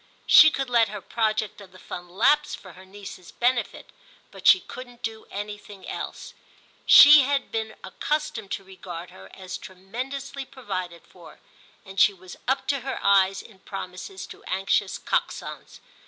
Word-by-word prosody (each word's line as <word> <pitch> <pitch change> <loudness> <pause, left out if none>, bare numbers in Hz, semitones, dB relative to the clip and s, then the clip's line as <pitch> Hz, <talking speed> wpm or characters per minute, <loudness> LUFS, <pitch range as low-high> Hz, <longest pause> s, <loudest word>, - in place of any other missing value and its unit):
She 315 - +9
could 270 -3 -3
let 235 -3 +3
her 210 0 -6
project 215 0 -2
of 190 -2 -14
the 185 - -15
Fund 175 -1 -9
lapse 290 +11 +2
for 185 -3 -13
her 185 +2 -14
niece's 195 -2 -11
benefit, 245 0 -1 0.4
but - - -4
she 370 - +8
couldn't 245 -5 -11
do 220 -1 -5
anything 205 -1 -8
else. - - -6 0.5
She 295 0 +10
had 275 +1 -1
been 220 -1 -3
accustomed 300 -9 -3
to - - -4
regard 180 -2 -9
her 95 0 -14
as 185 -1 -7
tremendously 255 +9 -6
provided 185 -10 -6
for, - - -16 0.5
and 195 0 -7
she 200 -1 +5
was 185 -1 -12
up 265 +1 0
to 280 -1 +1
her 265 +1 -4
eyes 195 -1 +3
in 205 -5 -17
promises 190 0 -7
to - - -13
anxious 190 +1 0
Coxons. - - -3
205 Hz, 155 wpm, -25 LUFS, 190-255 Hz, 0.5 s, She